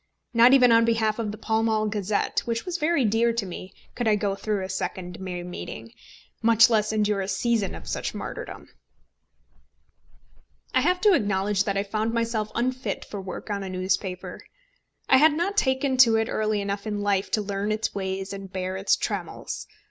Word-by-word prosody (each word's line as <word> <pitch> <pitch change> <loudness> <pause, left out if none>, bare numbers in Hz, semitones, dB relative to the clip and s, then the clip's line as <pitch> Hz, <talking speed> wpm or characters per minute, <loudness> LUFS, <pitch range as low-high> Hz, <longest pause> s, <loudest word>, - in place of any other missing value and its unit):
Not 235 +1 +7
even 250 -3 +6
on 230 0 +6
behalf 225 -1 +1
of 215 -2 -2
the 210 - -8
Pall 220 +1 0
Mall 220 -1 +1
Gazette, 205 -1 -1
which 230 -1 -2
was 360 -1 -3
very 305 -4 +2
dear 225 +2 +2
to 230 -3 -2
me, 185 +1 -8 0.2
could 240 -2 -2
I 215 - +4
go 205 -1 -1
through 200 0 -2
a - - -4
second 185 -1 -4
May 180 -2 -5
meeting, 180 0 -7 0.5
much 230 +1 +6
less 215 -1 +2
endure 210 -2 +1
a 190 - -3
season 225 -1 0
of - - -10
such - - -3
martyrdom. - - -7 2.1
I - - +4
have 360 0 +1
to 420 -2 +5
acknowledge 200 - +1
that 200 -1 -1
I 195 - +1
found 215 +3 -2
myself 225 -2 -1
unfit 250 -3 -2
for 200 - -6
work 190 +3 -7
on 200 -1 -2
a 195 - -5
newspaper. 185 0 -3 0.7
I - - +6
had 305 +3 +6
not 350 +6 -1
taken 265 -6 +1
to 235 -3 +7
it 225 0 +1
early 215 -1 0
enough 200 +1 -3
in 210 -1 -2
life 200 -1 0
to 215 - +2
learn 200 +1 -2
its 215 +1 -1
ways 190 0 -3
and 195 -1 -8
bear 185 0 -3
its 195 - +2
trammels. - - -4
215 Hz, 190 wpm, -25 LUFS, 195-230 Hz, 2.1 s, Not